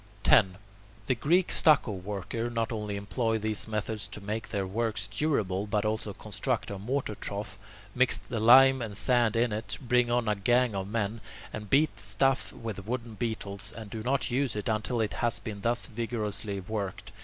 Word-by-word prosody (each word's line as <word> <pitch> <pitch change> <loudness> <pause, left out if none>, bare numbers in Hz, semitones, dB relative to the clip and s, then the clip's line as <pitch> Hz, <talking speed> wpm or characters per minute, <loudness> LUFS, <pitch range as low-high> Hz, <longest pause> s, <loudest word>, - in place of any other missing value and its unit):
10. 95 -4 +5 0.5
The - - +2
Greek 170 +9 +2
stucco 150 -7 +5
workers 105 +4 -4
not 115 0 -1
only 105 -2 -3
employ 110 +3 -1
these 110 0 -2
methods 110 -1 -3
to 100 +1 -9
make 105 +2 -4
their 100 -2 -1
works 110 +3 -1
durable, 105 -10 -1
but 105 +1 0
also 110 -1 -1
construct 100 - -3
a 100 - -5
mortar 125 +2 -2
trough, 100 -2 -6 0.3
mix 130 0 +3
the 115 - -5
lime 130 +3 +7
and 105 -4 -4
sand 120 -3 +3
in 115 -1 +2
it, 105 0 -4
bring 125 -2 +2
on 120 -1 +1
a 105 - +3
gang 120 +4 +2
of 95 -1 -3
men, 110 +1 -2 0.3
and 105 -2 -6
beat 150 +3 +3
the - - -12
stuff 130 +6 +1
with 105 -4 -7
wooden 120 -1 -3
beetles, 105 -3 -3
and 110 -2 -9
do 110 - -5
not 130 +2 0
use 130 -1 0
it 105 - -3
until 110 +2 -1
it 110 - -1
has 120 -1 +1
been 105 -3 -7
thus 120 +3 0
vigorously 110 -4 -3
worked. 100 0 -5
110 Hz, 185 wpm, -29 LUFS, 105-120 Hz, 0.5 s, lime